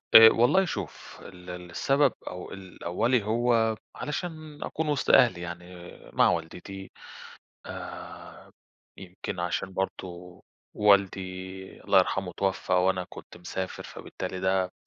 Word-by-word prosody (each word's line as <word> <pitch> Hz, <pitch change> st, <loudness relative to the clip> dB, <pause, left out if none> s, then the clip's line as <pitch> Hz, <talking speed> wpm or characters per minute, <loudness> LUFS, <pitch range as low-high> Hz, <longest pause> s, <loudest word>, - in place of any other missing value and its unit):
آآ 110 Hz, 0 st, +13 dB
والله 125 Hz, +14 st, +4 dB
شوف، 100 Hz, -, -6 dB
ال 90 Hz, -1 st, -12 dB
ال 90 Hz, -1 st, -7 dB
السبب 135 Hz, +6 st, +3 dB
أو 90 Hz, 0 st, -6 dB
ال 95 Hz, -2 st, -10 dB
الأولي 115 Hz, +7 st, +1 dB
هو 115 Hz, 0 st, +2 dB, 0.2 s
علشان 155 Hz, -1 st, -5 dB
أكون 155 Hz, -1 st, -2 dB
وسط 145 Hz, -, 0 dB
أهلي، 115 Hz, -10 st, +6 dB
يعني 85 Hz, +1 st, -8 dB, 0.2 s
مع -, -, +5 dB
والدتي. 90 Hz, +3 st, -4 dB, 0.8 s
آآ، -, -, -9 dB, 0.5 s
يمكن 90 Hz, 0 st, -6 dB
عشان 90 Hz, +2 st, -2 dB
برضو 90 Hz, -2 st, -5 dB, 0.3 s
والدي، 95 Hz, -2 st, +1 dB
الله -, -, +5 dB
يرحمه، 95 Hz, -2 st, +1 dB
اتوفى 95 Hz, 0 st, -1 dB
وأنا 90 Hz, 0 st, +3 dB
كنت -, -, -11 dB
مسافر، 95 Hz, +2 st, -5 dB
فبالتالي 95 Hz, -, -6 dB
ده 95 Hz, -1 st, +1 dB
95 Hz, 120 wpm, -28 LUFS, 90-115 Hz, 0.8 s, آآ